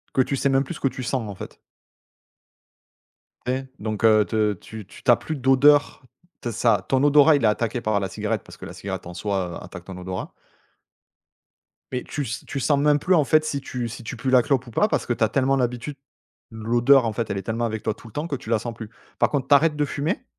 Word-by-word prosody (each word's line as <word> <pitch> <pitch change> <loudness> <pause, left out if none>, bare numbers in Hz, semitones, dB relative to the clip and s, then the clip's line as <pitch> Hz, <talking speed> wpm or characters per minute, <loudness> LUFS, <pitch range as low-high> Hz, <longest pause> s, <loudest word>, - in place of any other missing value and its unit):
que 130 - +5
tu 135 +1 -1
sais - - +1
même 135 0 +3
plus 165 - -7
ce - - -10
que 135 - +1
tu 130 -1 -5
sens, 120 -4 -2
en 100 - -7
fait. - - -10 1.9
Et, 130 +1 -1
donc 110 +1 -4
heu, 110 -1 +5
te 105 -1 +1
tu 105 +2 -11
tu - - -15
tu - - +5
as 120 - +7
plus 160 - -5
d'odeur. 140 +3 +4 0.4
T 120 - -3
ça 105 -3 +2
ton 135 +1 +2
odorat 145 +1 +6
il 140 - 0
est - - +5
attaqué 115 +3 0
par 110 -3 0
la 95 -1 -3
cigarette 105 +1 -2
parce - - -14
que - - -9
la - - -8
cigarette - - -6
en 90 - -8
soi, 90 -1 -3
heu, - - -9
attaque - - -10
ton 95 - -8
odorat 95 0 -6 1.6
mais 125 -1 -3
tu 145 - -4
s 120 +1 -5
tu 140 - -4
sens 140 +2 +2
même 150 0 +3
plus, 185 +5 +2
en 155 - +4
fait, 155 +4 +3
si 140 -2 -2
tu 125 -2 -4
si 115 - -8
tu 110 - -6
pues 130 +3 -2
la 125 - +6
clope 130 0 0
ou - - -10
pas, 210 - +2
parce - - -1
que 120 - 0
tu 115 - -1
as 110 - +3
tellement 135 0 +2
l'habitude 125 +2 -2 0.6
l'odeur, 120 +4 +3
en 110 - -1
fait, 115 0 -3
elle 100 - -2
est 95 - -2
tellement 115 +4 -2
avec 110 -2 -4
toi 110 - 0
tout 115 - -15
le 110 - -15
temps 150 +3 -3
que 145 - -2
tu 120 - -9
la 115 -2 +2
sens 120 +2 -5
plus. 110 -2 -8 0.3
Par - - +3
contre 140 -3 -1
tu 145 - +6
arrêtes 150 +1 +3
de 150 - 0
fumer 160 - -3
120 Hz, 255 wpm, -23 LUFS, 110-140 Hz, 1.9 s, as